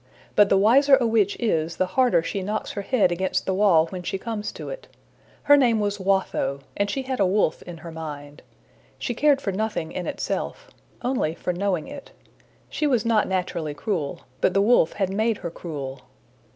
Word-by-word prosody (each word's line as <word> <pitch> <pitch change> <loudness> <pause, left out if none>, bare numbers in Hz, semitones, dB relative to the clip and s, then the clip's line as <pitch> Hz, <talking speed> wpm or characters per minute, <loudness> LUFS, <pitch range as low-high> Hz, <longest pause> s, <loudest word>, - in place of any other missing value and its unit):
But 205 -1 +6
the 195 - +4
wiser 270 +8 +6
a 260 -3 0
witch 220 -3 +2
is, 165 -8 0
the 185 - +2
harder 185 -4 +2
she 195 +3 -3
knocks 210 +3 -3
her 200 - -4
head 200 -3 +2
against 185 +2 -1
the 190 - 0
wall 185 -5 +4
when 185 -2 -5
she 180 - -3
comes 215 +1 -4
to - - -7
it. - - -8 0.6
Her 290 - +7
name 240 -6 +3
was 205 0 -1
Watho, 190 -8 0
and 200 0 0
she 270 - -2
had 260 -1 -3
a 195 - +4
wolf 190 -3 +1
in 175 -1 -9
her 165 +1 -9
mind. 150 -3 -8 0.6
She - - -3
cared 285 +3 +3
for 195 - -1
nothing 200 -5 -2
in 180 - -4
itself - - -4 0.3
only 245 -11 0
for 180 - -3
knowing 180 -3 -1
it. 285 -1 -9 0.6
She 300 - -1
was 245 -6 +1
not 225 -2 +2
naturally 175 -5 -2
cruel, 160 -5 -3 0.2
but 185 - +2
the 195 - +4
wolf 210 -7 +4
had 195 -2 -1
made 220 +1 +1
her 170 - -3
cruel. 140 -6 -6
195 Hz, 195 wpm, -24 LUFS, 170-230 Hz, 0.6 s, Her